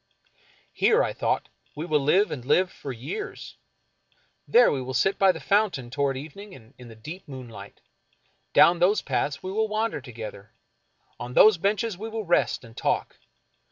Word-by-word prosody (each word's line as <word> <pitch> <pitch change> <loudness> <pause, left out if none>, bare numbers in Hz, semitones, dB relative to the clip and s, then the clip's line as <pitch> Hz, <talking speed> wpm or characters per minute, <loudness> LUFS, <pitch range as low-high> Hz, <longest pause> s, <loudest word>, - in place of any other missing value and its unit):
Here, - - +3
I - - -2
thought, - - -1 0.3
we 155 +2 -5
will 155 -4 +2
live 180 +9 +2
and 125 - -5
live 180 +8 +2
for 140 - -8
years. 130 - -7 0.9
There 475 - +5
we 135 - -2
will 130 +1 -5
sit 195 +11 +1
by 195 -1 +6
the - - -8
fountain 185 - 0
toward 140 0 0
evening 185 +8 -10
and 115 0 -17
in 125 - -11
the 115 - -12
deep 155 - -10
moonlight. 115 -7 -10 0.7
Down 170 0 +6
those 190 +5 +3
paths 140 +1 -2
we 185 - -4
will 220 +2 0
wander 215 -6 -2
together. 110 -4 -9 0.7
On 125 - -6
those 215 -5 +7
benches 200 +1 -1
we 220 +2 -5
will 220 -1 -5
rest 175 -5 +1
and 115 -1 -14
talk. - - -1
150 Hz, 170 wpm, -25 LUFS, 125-200 Hz, 0.9 s, those